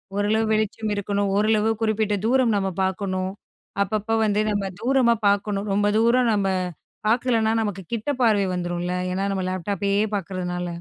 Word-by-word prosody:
ஓரளவு 215 +2 +1
வெளிச்சம் 215 0 -1
இருக்கணும். 200 0 -1
ஓரளவு 215 +1 +2
குறிப்பிட்ட 215 -1 +1
தூரம் 245 -1 +3
நம்ம 195 -1 0
பார்க்கணும். 190 0 -2 0.5
அப்பப்போ 215 +2 -1
வந்து 210 0 +1
நம்ம 205 -1 -1 0.2
தூரமா 250 -1 +3
பார்க்கணும். 200 0 0
ரொம்ப 205 +1 +2
தூரம் 235 +2 +3
நம்ம 200 -2 +1 0.6
பார்க்கலன்னா, 230 -1 +2
நமக்கு 205 -3 -3
கிட்ட 230 +5 -2
பார்வை 210 -4 +3
வந்துரும்ல. 175 0 -2 0.2
ஏன்னா, 190 +2 -1
நம்ம 190 -1 -2
லேப்டாப்பையே 200 +2 -1
பார்க்குறதுனால. 180 -2 -3
205 Hz, 140 wpm, -23 LUFS, 195-220 Hz, 0.6 s, தூரம்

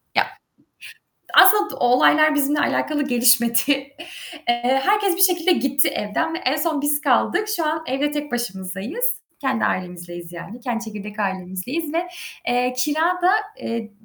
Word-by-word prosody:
Ya - - +4 1.1
aslında 405 +2 +6
olaylar 300 +5 +4
bizimle 290 0 +1
alakalı 295 0 0
gelişmedi. 240 -2 +4 0.9
Eee, 245 +3 +1
herkes 400 -2 +2
bir - - -5
şekilde 360 -1 +4
gitti 275 -4 +2
evden 210 +10 -2
ve - - -2
en 275 -4 0
son 310 -1 -1
biz 290 0 +1
kaldık. 320 - +1
Şu 330 - -1
an 315 +1 -1
evde 280 +2 -1
tek 295 -1 -5
başımızdayız. 200 - -4 0.4
Kendi 265 -5 -1
ailemizleyiz 175 -1 -5
yani, 195 +7 -9
kendi 235 -2 -3
çekirdek 210 -1 -8
ailemizdeyiz 190 - -4
ve, 345 +2 -1 0.4
eee, 245 +1 +1
kira 295 +4 0 0.2
da, 360 - +5 0.3
eee, 230 -1 -5
265 Hz, 140 wpm, -21 LUFS, 225-310 Hz, 1.1 s, aslında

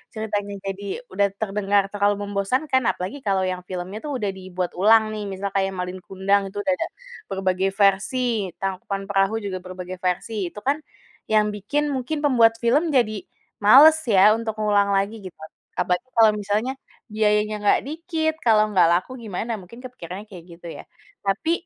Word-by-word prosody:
ceritanya 205 -2 -3
jadi 195 +4 -5
udah 200 +2 +2
terdengar 200 -1 +1
terlalu 205 0 +2
membosankan, 255 +8 0
apalagi 190 +11 -2
kalau 195 -5 0
yang 185 -1 -2
filmnya 185 +3 -5
tuh 290 -2 -3
udah 210 -5 -1
dibuat 185 -1 -5
ulang 220 +2 +5
nih, 210 -1 -5
misal 195 0 -4
kayak 195 -1 0
Malin 180 0 -4
Kundang 195 +2 0
itu 205 +1 -5
udah 280 - +1
ada 330 - -2 0.4
berbagai 190 0 -1
versi, 210 +2 +1
Tangkuban 195 +1 -4
Perahu 195 +2 +2
juga 190 -2 -3
berbagai 185 0 -8
versi, 185 +2 -2
itu 210 - -9
kan, 280 +3 +1 0.5
yang 215 -1 +3
bikin 285 +9 -2
mungkin 275 +3 -3
pembuat 230 -5 +4
film 290 +8 +3
jadi 215 -5 +2 0.4
males 280 +10 +8
ya 205 0 +6
untuk 225 -1 -4
ngulang 205 -1 +2
lagi 205 +3 -1
gitu. 185 -3 -10 0.4
Apalagi 180 +8 -1
kalau 220 -2 +6
misalnya 210 +4 -1 0.4
biayanya 210 0 +1
nggak 205 - +4
dikit, 320 0 -2
kalau 215 -2 +4
nggak 180 -4 +5
laku 185 +8 -2
gimana? 220 +1 -4
Mungkin 235 +8 -13
kepikirannya 200 -6 -8
kayak 180 -4 -11
gitu, 175 - -11
ya. - - -9 0.4
Tapi, 200 +12 0
205 Hz, 165 wpm, -23 LUFS, 190-225 Hz, 0.5 s, males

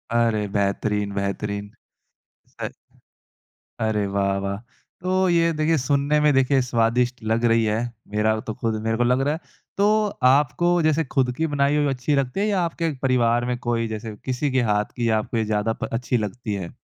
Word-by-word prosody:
अरे! 110 -3 +2
बेहतरीन, 100 0 0
बेहतरीन। 100 +1 -3 0.9
अ, - - -2 1.2
अरे! 110 -1 +1
वाह, 100 0 +2
वाह। 100 0 -2 0.5
तो 185 0 0 0.2
ये 165 0 +3
देखिए 160 +1 +3
सुनने 145 +2 +2
में 150 - +5
देखिए 135 0 +3
स्वादिष्ट 120 +1 +1
लग 115 +1 +2
रही 115 0 +3
है। 105 +1 +1 0.4
मेरा 110 +1 +3
वो 110 - -4
तो - - -1
खुद 115 -1 +1
मेरे 115 0 +1
को 120 - +2
लग 125 +2 +2
रहा - - +1
है। 160 - -4 0.4
तो 200 +1 +4 0.4
आपको 150 +5 +2 0.2
जैसे 155 +1 +2
खुद 130 -2 +3
की 160 - +2
बनाई 140 +1 +2
हुई 145 - +2
अच्छी 135 +3 0
लगती 130 +7 -5
है 205 - +2
या 195 -3 +1
आपके 165 -1 -2
परिवार 120 -2 +2
में 120 - -1
कोई 115 -1 0
जैसे 110 0 -6
किसी 130 +2 0
के - - +4
हाथ 105 0 -1
की 115 -1 +1
आपको 115 - -4
ये 110 - +1
ज़्यादा 105 +2 +1
प - - -2
अच्छी 125 0 0
लगती 110 +1 -5
है? 85 - -10
120 Hz, 190 wpm, -23 LUFS, 110-140 Hz, 1.2 s, में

